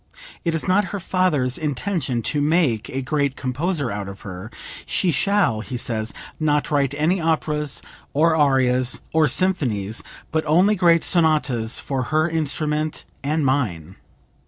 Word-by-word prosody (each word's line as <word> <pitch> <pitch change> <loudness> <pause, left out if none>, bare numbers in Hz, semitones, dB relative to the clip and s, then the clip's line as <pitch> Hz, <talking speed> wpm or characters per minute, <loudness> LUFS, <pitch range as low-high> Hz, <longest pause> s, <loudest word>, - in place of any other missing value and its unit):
It 165 -2 0
is 165 - -2
not 190 +2 +3
her 200 +3 -5
father's 165 -9 0
intention 145 - -2
to 145 +4 0
make 145 -8 +1
a 135 0 -3
great 140 0 0
composer 140 +1 -2
out 100 -1 -4
of 100 0 -10
her. 95 +2 -8 0.4
'She 180 - +1
shall,' 165 - +2
he 125 +2 -5
says, 110 -2 -1 0.3
'not 150 -1 +1
write 140 -2 +1
any 170 +5 +1
operas, 150 -3 -1 0.3
or 160 +3 +3
arias, 130 -4 +2
or 160 -1 +4
symphonies, 125 - +1 0.3
but 160 0 0
only 180 +7 +4
great 170 -4 +3
sonatas 150 -9 +2
for 130 -3 -3
her 155 +1 +2
instrument 155 -1 -2 0.2
and 150 +1 0
mine!' 95 - -1
150 Hz, 145 wpm, -22 LUFS, 125-165 Hz, 0.4 s, or